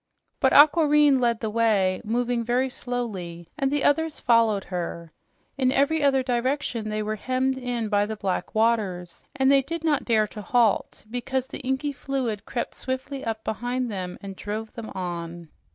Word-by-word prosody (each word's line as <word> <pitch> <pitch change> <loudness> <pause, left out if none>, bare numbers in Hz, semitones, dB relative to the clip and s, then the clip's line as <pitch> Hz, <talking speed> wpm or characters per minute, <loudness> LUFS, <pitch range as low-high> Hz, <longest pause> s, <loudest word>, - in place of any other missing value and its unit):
But - - +3
Aquareine 295 -2 +6
led 235 -2 +1
the 220 -2 -2
way, 210 -5 +2
moving 240 +1 0
very 250 +3 0
slowly, 190 -10 -5
and 275 -2 0
the 290 0 0
others 320 +1 +1
followed 230 -4 +3
her. 170 -2 -5 0.5
In 260 -1 +3
every 285 +4 +2
other 270 -2 +3
direction 245 -2 -1
they 215 0 -2
were 215 +1 -3
hemmed 260 +3 0
in 245 -3 -3
by 205 -1 +2
the 220 - -4
black 195 -1 -3
waters, 205 -6 0
and 265 -1 +3
they 275 -1 +6
did 330 +4 -5
not 300 -4 +1
dare 220 -3 +3
to 210 - -8
halt, 220 +1 +1
because 250 +1 -2
the - - -8
inky 265 +3 -1
fluid 255 -6 -3
crept 240 - -3
swiftly 260 +1 -4
up 220 -1 -3
behind 245 +2 -2
them 185 -3 -5
and 195 -1 -7
drove 215 +3 -5
them 230 -2 -7
on. 170 -2 -5
235 Hz, 170 wpm, -25 LUFS, 210-265 Hz, 0.5 s, Aquareine